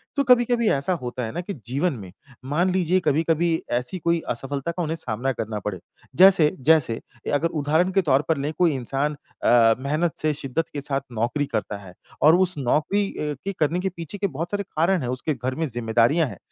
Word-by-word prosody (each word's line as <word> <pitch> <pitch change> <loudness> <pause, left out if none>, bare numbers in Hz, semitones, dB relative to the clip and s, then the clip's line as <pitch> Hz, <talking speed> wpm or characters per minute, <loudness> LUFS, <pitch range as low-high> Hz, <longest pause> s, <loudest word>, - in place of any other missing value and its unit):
तो 280 - +2
कभी-कभी 240 -2 +4
ऐसा 140 +7 +1
होता 125 0 -4
है 110 - -4
ना 175 - -4
कि 200 +3 -6
जीवन 140 +7 0
में, 95 -4 -10 0.3
मान 170 +7 +1
लीजिए 185 0 +2
कभी-कभी 160 +1 +1 0.2
ऐसी 125 +9 -2
कोई 170 +1 +1
असफ़लता 135 +5 -3
का 175 +1 -4
उन्हें 160 0 -2
सामना 130 -4 -2
करना 110 -2 -4
पड़े। 95 -4 -3 0.4
जैसे, 185 -5 +7
जैसे 145 -4 +4
ये 120 +1 -9
अगर 150 +4 +2
उदाहरण 160 +6 +2
के 195 - +3
तौर 135 +1 +4
पर 160 - +2
लें, 145 +2 -2
कोई 175 -2 +3
इंसान 135 +4 -2 0.3
अ, 115 -2 +5
मेहनत 155 +5 -1
से 155 -1 0
शिद्दत 145 +2 -2
के 145 - -4
साथ 140 0 -2
नौकरी 120 +6 -1
करता 105 -4 -3
है 95 -3 -13 0.3
और 155 +3 +7
उस 185 -2 +3
नौकरी 150 +10 +1 0.2
ए, 150 -1 -2
के 200 - -2
करने 160 +3 +1
के 190 - -1
पीछे 170 +4 -7
के 200 - 0
बहुत 165 +1 -5
सारे 205 0 -1
कारण 175 0 0
हैं, 125 - -3
उसके 130 +5 -2
घर 130 0 -4
में 160 - -1
ज़िम्मेदारियाँ 120 +6 +2
हैं। 100 -7 -9
150 Hz, 210 wpm, -23 LUFS, 125-175 Hz, 0.4 s, जैसे